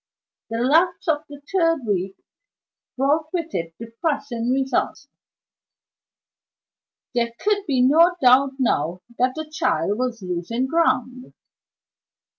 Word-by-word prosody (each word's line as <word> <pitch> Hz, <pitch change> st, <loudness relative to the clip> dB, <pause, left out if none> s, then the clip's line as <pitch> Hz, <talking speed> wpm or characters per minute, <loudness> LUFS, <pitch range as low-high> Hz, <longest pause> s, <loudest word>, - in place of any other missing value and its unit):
The 225 Hz, -, -3 dB
lapse 320 Hz, +11 st, +2 dB
of 300 Hz, -1 st, 0 dB
the 285 Hz, -1 st, -11 dB
third 330 Hz, -7 st, +2 dB
week 195 Hz, -2 st, -1 dB, 0.8 s
brought 300 Hz, +4 st, +1 dB
with 335 Hz, -3 st, -3 dB
it 165 Hz, -1 st, -4 dB
depressing 235 Hz, 0 st, -3 dB
results. 265 Hz, +1 st, -1 dB, 2.1 s
There 235 Hz, -1 st, 0 dB
could 410 Hz, -1 st, 0 dB
be 260 Hz, -3 st, +2 dB
no 330 Hz, +7 st, +5 dB
doubt 265 Hz, 0 st, +5 dB
now 180 Hz, -, 0 dB, 0.2 s
that 255 Hz, +1 st, +2 dB
the 315 Hz, -1 st, -5 dB
child 205 Hz, -, 0 dB
was 245 Hz, -4 st, -2 dB
losing 180 Hz, +8 st, -2 dB
ground. 255 Hz, -5 st, 0 dB
255 Hz, 110 wpm, -22 LUFS, 230-310 Hz, 2.1 s, no